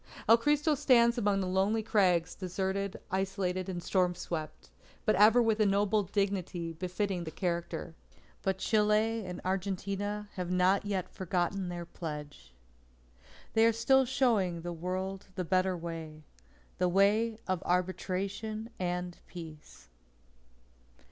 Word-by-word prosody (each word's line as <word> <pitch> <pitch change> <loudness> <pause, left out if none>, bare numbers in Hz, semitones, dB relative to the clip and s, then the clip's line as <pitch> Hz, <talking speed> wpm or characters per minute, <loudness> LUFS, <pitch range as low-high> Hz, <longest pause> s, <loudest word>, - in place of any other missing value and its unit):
"El 225 - +9
Cristo 295 +4 +2
stands 245 -4 +4
among 205 -3 +2
the - - -1
lonely 195 +4 +1
crags 180 -6 +2
deserted, 190 +1 -3
isolated, 190 -1 -1
and 175 -2 -4
storm 180 -2 +1
swept; 155 - -6 0.3
but - - +4
ever 215 +5 +6
with 225 -1 +1
a 215 - +4
noble 205 +2 +2
dignity 190 -4 -2
befitting 185 +2 -2
the 160 - -5
character." 170 0 -3 0.5
But 190 -1 0
Chile 215 +2 +2
and 180 -1 -6
Argentina 200 +2 -2
have 180 -1 -3
not 180 +2 +3
yet 190 -3 -1
forgotten 185 +1 -2
their 175 -1 -5
pledge. 150 -4 -8 1.0
They 225 - +4
are 230 - +6
still 265 +4 +3
showing 225 -10 +1
the 175 +1 -4
World 185 +3 -4
the 185 - -2
Better 185 +1 +1
Way 165 -2 -7 0.6
the 180 0 +3
way 210 +4 +3
of 185 -2 0
Arbitration 195 +5 -2
and 180 -1 -3
Peace. 160 -3 -11
190 Hz, 130 wpm, -31 LUFS, 175-210 Hz, 1.0 s, El